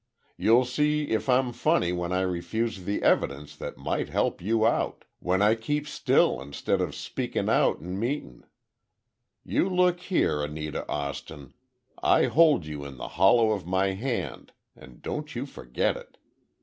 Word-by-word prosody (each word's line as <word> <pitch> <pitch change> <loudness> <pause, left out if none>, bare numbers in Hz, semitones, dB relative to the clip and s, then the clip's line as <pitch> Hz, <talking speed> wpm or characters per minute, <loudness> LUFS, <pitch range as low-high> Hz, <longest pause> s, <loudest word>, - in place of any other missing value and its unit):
You'll 120 +3 +4
see 150 +4 0
if 110 +4 -1
I'm 125 -1 +3
funny 90 -5 +2
when 90 0 -3
I 90 0 +1
refuse 95 +3 -2
the 100 - -2
evidence 70 +2 +1
that - - -6
might - - -2
help - - 0
you 110 +4 +1
out. 115 - 0
When 95 +3 +1
I 105 +1 +5
keep 145 +7 -2
still 110 - +2
instead 70 +1 -2
of - - -2
speakin' - - -3
out - - +2
in 90 +3 -5
meetin'! 120 - -4 1.0
You 190 - +1
look 180 -1 +2
here, 175 - 0
Anita 75 +1 -4
Austin, 70 -1 -5 0.5
I - - +4
hold 155 - +4
you 75 -1 -6
in 70 -2 -9
the - - -6
hollow 110 +6 +4
of 100 -5 -3
my 95 +1 +1
hand, 115 +6 -4 0.2
and 65 -2 -16
don't 150 -2 -5
you 125 +3 -3
forget 60 - -2
it! - - -12
100 Hz, 160 wpm, -27 LUFS, 80-130 Hz, 1.0 s, I